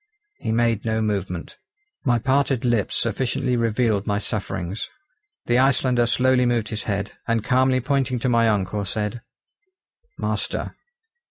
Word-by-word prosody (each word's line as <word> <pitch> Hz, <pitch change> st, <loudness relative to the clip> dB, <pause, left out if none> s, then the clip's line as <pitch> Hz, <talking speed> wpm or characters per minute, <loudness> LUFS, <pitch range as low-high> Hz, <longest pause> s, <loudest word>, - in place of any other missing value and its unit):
He -, -, -2 dB
made 115 Hz, -1 st, +1 dB
no 110 Hz, -1 st, 0 dB
movement. 95 Hz, -5 st, -3 dB, 0.4 s
My 120 Hz, -2 st, +3 dB
parted 135 Hz, +1 st, +1 dB
lips 120 Hz, -4 st, +1 dB
sufficiently 125 Hz, +3 st, 0 dB
revealed 115 Hz, -3 st, +1 dB
my 100 Hz, -, +1 dB
sufferings. 95 Hz, -3 st, -3 dB, 0.6 s
The 120 Hz, +1 st, +3 dB
Icelander 130 Hz, -2 st, +3 dB
slowly 125 Hz, +1 st, +3 dB
moved 120 Hz, -3 st, 0 dB
his 110 Hz, -1 st, -4 dB
head, 100 Hz, -1 st, -2 dB, 0.2 s
and 115 Hz, -2 st, +1 dB
calmly 130 Hz, 0 st, +3 dB
pointing 135 Hz, 0 st, 0 dB
to 125 Hz, -, -1 dB
my 115 Hz, -2 st, +4 dB
uncle 105 Hz, 0 st, 0 dB
said: 105 Hz, +3 st, -3 dB, 1.0 s
"Master." -, -, -2 dB
115 Hz, 135 wpm, -23 LUFS, 105-125 Hz, 1.0 s, my